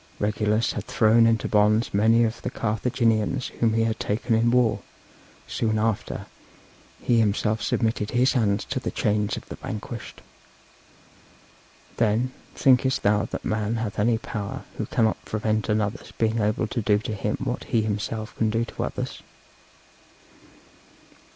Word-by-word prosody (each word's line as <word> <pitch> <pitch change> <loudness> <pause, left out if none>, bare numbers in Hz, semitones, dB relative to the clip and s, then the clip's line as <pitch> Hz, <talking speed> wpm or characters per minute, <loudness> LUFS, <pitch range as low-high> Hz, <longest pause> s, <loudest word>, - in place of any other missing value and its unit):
Regulus 105 +2 +1
had - - -5
thrown 115 +1 +4
into 115 -1 +1
bonds 105 +2 +3
many 110 +3 +4
of 115 +1 -2
the - - -3
Carthaginians 115 +1 0
whom 115 -2 +3
he 115 - +3
had 115 0 -1
taken 110 +3 -1
in 115 +1 +3
war; 120 -2 +3 0.7
soon 110 -1 -1
after 110 -1 -1 0.8
he 120 -1 +3
himself 110 0 +1
submitted 110 -1 0
his 125 +2 +3
hands 105 -5 +1
to - - -2
the - - -3
chains 105 0 0
of - - -9
the - - -8
vanquished. - - -7 1.8
Then, 115 +3 +1 0.2
thinkest 130 0 +3
thou 105 +1 +3
that - - -6
man 110 +1 -1
hath 110 -2 -3
any 115 +2 +3
power 105 -3 -5 0.2
who - - -2
cannot 110 -1 +1
prevent 110 0 -1
another's 105 0 -1
being 115 0 0
able 105 +1 +1
to 115 +2 -3
do 105 -1 +3
to 110 +1 -4
him 100 - -2
what - - -3
he 110 - +1
himself 110 +1 -3
can 110 - +1
do 115 +2 0
to - - -5
others? - - -4
110 Hz, 150 wpm, -25 LUFS, 105-115 Hz, 1.8 s, thrown